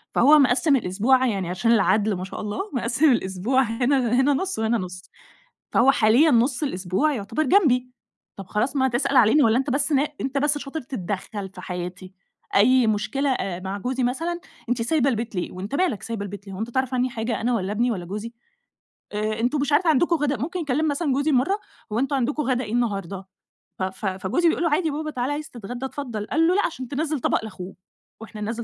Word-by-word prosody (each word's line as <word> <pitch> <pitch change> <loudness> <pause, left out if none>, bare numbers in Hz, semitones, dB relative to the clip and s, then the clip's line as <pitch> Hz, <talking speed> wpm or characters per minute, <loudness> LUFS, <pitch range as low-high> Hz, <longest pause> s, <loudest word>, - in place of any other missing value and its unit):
فهو 295 +5 +6
مقسّم 275 +3 +4
الأسبوع 245 +4 +2
يعني 195 -6 -2
عشان 190 +6 +1
العدل- 210 -1 +3
ما 180 - -5
شاء 190 - -6
الله 210 -1 -4
مقسّم 255 +5 +2
الأسبوع 215 +4 +1
هنا 245 +1 +1
هنا 285 +2 +3
نص، 380 +1 -2
وهنا 225 +1 +1
نص. 185 -2 -6 0.7
فهو 270 - +5
حاليًا 245 +6 +4
نص 245 +3 +2
الأسبوع 190 - 0
يعتبر 225 +6 -2
جنبي. 255 -6 +3 0.5
طب 195 - -8
خلاص 215 +9 -1
ما 265 -1 +3
تسأل 250 +3 0
علينا، 255 +5 +6
والّا 225 +1 +4
أنت 270 0 -2
بس 280 +3 0
نا 285 +2 +2
أنت 270 +1 -1
بس 290 +1 +1
شاطر 290 +3 -5
تتدخل 205 - -5
في 180 - -9
حياتي، 180 +1 -6 0.4
أي 250 +4 +5
مشكلة 220 +7 0
آآ 190 -8 -2
مع 190 +2 -4
جوزي 255 +5 -2
مثلًا، 330 +8 -1 0.3
أنتِ 245 -1 0
سايبة 275 +2 +2
البيت 230 -2 -3
ليه؟ 180 - -3
وأنت 190 +7 -6
مالك 285 - 0
سايبة 230 -3 -4
البيت 200 0 -8
ليه، 195 - -8
هو - - -8
أنت 225 +2 -3
تعرف 260 0 -1
عني 255 0 +1
حاجة 230 0 -3
أنا، 245 +2 +1
والّا 195 -3 -1
ابني، 240 +4 +1
والّا 185 -6 -3
جوزي؟ 210 +6 -6 0.8
آآ، 215 +1 -2
أنتم 250 +6 +1
مش 290 +1 -1
عارفة 320 +3 +4
عندكم 335 +4 +3
غدا 290 -2 0
ممكن 340 - -3
يكلّم 305 0 0
مثلًا 290 -1 0
جوزي 285 +3 +1
مرّة، 285 +11 +2 0.3
"هو 220 - 0
أنتم 275 +2 0
عندكم 280 +4 0
غدا 255 -2 0
إيه 210 - -7
النهارده؟" 195 -5 -2 0.5
ف - - -1
ف 190 +3 -5
فجوزي 195 - 0
بيقول 335 - 0
له: 335 - +2
"عادي 320 +2 +2
يابابا 305 +1 -3
تعال 255 0 -2
عايز 300 +1 -4
تتغدى، 245 +3 -7
اتفضّل" 240 -6 -5
قال 325 +4 +2
له: 360 - +3
"لأ." 410 - +2
عشان 260 -6 -5
تنزّل 300 +2 -2
طبق 230 - 0
لاخوه. 190 -3 -8 0.5
وإحنا 220 -1 -9
ننزّل 225 +3 -3
245 Hz, 205 wpm, -24 LUFS, 210-280 Hz, 0.8 s, فهو